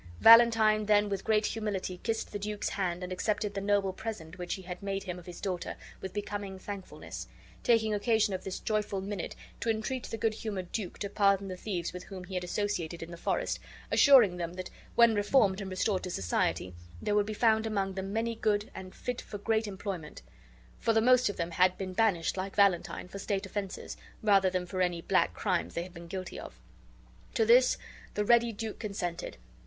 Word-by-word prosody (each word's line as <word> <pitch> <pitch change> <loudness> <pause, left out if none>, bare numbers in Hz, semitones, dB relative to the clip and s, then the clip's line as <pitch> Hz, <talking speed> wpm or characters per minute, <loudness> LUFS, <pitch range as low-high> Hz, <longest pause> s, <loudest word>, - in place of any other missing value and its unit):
Valentine 225 -2 +7
then 205 -1 +4
with 195 -1 -2
great 215 -1 +2
humility 200 -4 -3
kissed 225 -1 -2
the 205 - -4
duke's 210 +1 -2
hand 180 -2 -2
and 180 0 -4
accepted 210 +2 -1
the 195 - -3
noble 200 -1 +1
present 185 -6 -6
which 180 - -2
he 190 - -10
had 180 0 -7
made 195 -1 -2
him 180 -2 -5
of 175 - -15
his 175 - -8
daughter 185 -3 -3 0.3
with 190 - -5
becoming 205 -1 -4
thankfulness, 195 0 -7 0.3
taking 220 -2 +3
occasion 210 -1 +2
of 185 - -4
this 190 - -4
joyful 210 -2 -1
minute 195 -1 -4 0.2
to 230 - -2
entreat 225 +3 -1
the 225 - -4
good 220 0 +1
humored 200 -5 -5
duke 205 -6 -4
to 200 - -3
pardon 200 -1 +2
the 185 - -4
thieves 180 -3 -3
with 180 0 -7
whom 190 -2 -8
he 185 +1 -10
had 180 -1 -1
associated 175 -3 -2
in 165 - -9
the - - -6
forest, 170 - -1 0.3
assuring 235 -11 +7
him 170 0 -3
that 185 0 -6 0.2
when 235 -1 +6
reformed 205 -2 +3
and 195 - -5
restored 185 +1 0
to 185 - -5
society 90 - -1 0.3
there 205 - -1
would 205 0 +3
be - - -3
found 220 0 +3
among 195 -3 -1
them 190 +1 -4
many 225 +2 0
good, 210 -2 0
and 185 -1 -9
fit 250 -1 -4
for 205 - -7
great 220 +1 0
employment; 190 - -6 0.6
for 225 - +2
the 220 - +4
most 250 +1 +5
of 205 - -5
them 170 0 -2
had 185 +1 +3
been 190 -1 -4
banished, 190 -5 +2
like 190 +1 -4
Valentine, 195 -3 +2
for 200 +2 -8
state 195 0 -2
offenses, 200 -2 -5 0.3
rather 195 -3 +5
than 185 -1 -2
for 185 +1 -3
any 175 -2 +1
black 185 +3 +1
crimes 185 -5 -1
they 170 - -1
had 180 0 -11
been 170 -1 -10
guilty 185 +1 -5
of. - - -10 0.8
To 450 - +3
this 480 +2 +6 0.4
the' 210 - 0
ready 235 +1 +5
duke 220 0 -5
consented. 195 -5 -4
200 Hz, 205 wpm, -30 LUFS, 185-215 Hz, 0.8 s, Valentine